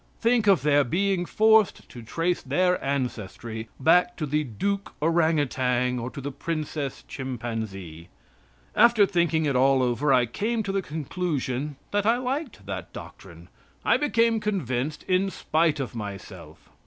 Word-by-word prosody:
Think 230 -2 +2
of 190 -9 +5
their 145 -1 +4
being 180 +5 0
forced 220 -1 +3
to 120 - -10
trace 165 +10 -1
their 180 +7 +1
ancestry 115 -4 -4
back 180 - +4
to 155 - -2
the 150 +1 0
Duke 195 - -3
Orang 165 0 +2
Outang 125 -2 0
or 120 +1 -4
to 140 - -9
the 140 +1 -4
Princess 150 -2 -4
Chimpanzee. 110 -10 -6 0.7
After 235 -2 +6
thinking 170 -4 +1
it 140 -2 0
all 130 +1 +4
over 125 +4 +1
I 125 -2 +5
came 220 - -2
to 200 - -3
the 195 0 0
conclusion 150 -4 -3 0.2
that 205 0 +1
I 230 +2 +4
liked 265 +5 -4
that - - -6
doctrine. - - -11 0.4
I - - +4
became 230 -6 +2
convinced 150 - -2
in 190 +1 +1
spite 160 -3 0
of 135 - -4
myself. 100 -5 -9
150 Hz, 150 wpm, -26 LUFS, 125-195 Hz, 0.7 s, After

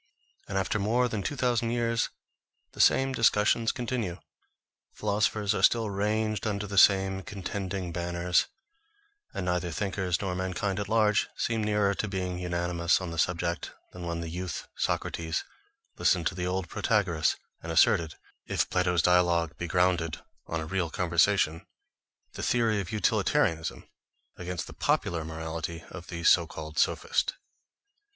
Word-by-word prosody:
And 95 - -2
after 95 +3 0
more 120 +5 +2
than 110 -4 -3
two 145 - -3
thousand 120 -3 +1
years 115 -1 0 0.6
the - - -2
same 135 0 +4
discussions 115 -1 +3
continue, 120 -8 -3 0.8
philosophers 105 0 +1
are - - -1
still 115 -3 +3
ranged 105 +1 0
under 105 -1 -2
the 100 -1 +2
same 95 -1 +5
contending 95 -1 -4
banners, 85 +1 +1 0.8
and 90 - -4
neither 90 -1 0
thinkers 95 0 -1
nor 95 -2 -2
mankind 95 +2 -2
at 100 - -4
large 105 -2 +3
seem 115 -2 0
nearer 105 -1 +2
to 105 - -2
being 90 -2 -3
unanimous 85 -1 +1
on 90 -3 -5
the 85 - -4
subject, 85 0 -1 0.2
than 90 -1 -7
when 85 0 -3
the 85 - -5
youth 90 0 -5
Socrates 80 -1 -1 0.6
listened 90 -3 +3
to - - +1
the 90 0 -3
old 95 0 -2
Protagoras, 95 -6 +1 0.3
and - - -5
asserted 80 -2 +3 0.3
(if - - 0
Plato's 90 -2 +2
dialogue 85 -2 +3
be 85 - -3
grounded 90 -2 +1 0.3
on 80 - -2
a 80 - -4
real 90 0 -1
conversation) 85 -1 +2 0.7
the - - -6
theory 115 -4 +2
of 95 +2 -7
utilitarianism 80 -5 +1 0.5
against 90 -1 -4
the - - -10
popular 85 -2 0
morality 80 +1 -5
of 85 -1 -9
the 85 -1 -6
so 85 -1 +5
called 75 0 -6
sophist. 470 +2 +1
90 Hz, 145 wpm, -28 LUFS, 85-105 Hz, 0.8 s, same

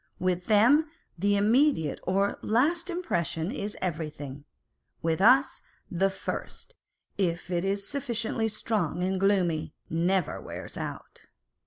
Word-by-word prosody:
With 180 -1 -1
them 250 +9 +5 0.3
the 200 +3 +2
immediate 220 - +3
or 195 +2 0
last 320 - +1
impression 175 - -2
is 210 -5 -4
everything: 150 -5 -4 0.6
with 165 +2 0
us, 260 +5 +5 0.3
the 190 +2 +2
first, 345 - -6 0.5
if 175 -1 -1
it 175 0 0
is 200 +1 -1
sufficiently 230 -5 -1
strong 205 -6 -1
and 190 +1 0
gloomy, 185 -5 +1 0.2
never 175 +1 0
wears - - -7
out! - - -7
195 Hz, 120 wpm, -28 LUFS, 170-230 Hz, 0.6 s, them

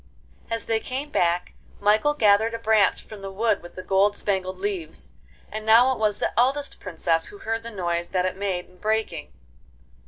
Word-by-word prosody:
As 230 0 -2
they 225 -1 +1
came 270 +5 -5
back, 175 -4 +1 0.3
Michael 215 +8 +3
gathered 220 -1 +4
a - - -2
branch 220 -2 +2
from 215 -2 -11
the 195 - -6
wood 220 +4 0
with 175 - -13
the 185 - -7
gold 195 +2 +2
spangled 190 -2 -1
leaves, 395 -4 -4 0.4
and 215 0 -5
now 230 +4 +6
it 255 - -3
was 210 -2 +1
the - - -1
eldest 275 +3 +1
Princess 165 -2 -1
who 205 - -11
heard 225 +2 -3
the 230 - -7
noise 175 -4 -2
that 185 -1 0
it 185 - -1
made 190 -2 -2
in 180 - -22
breaking. 215 -7 -2
210 Hz, 190 wpm, -24 LUFS, 185-230 Hz, 0.4 s, now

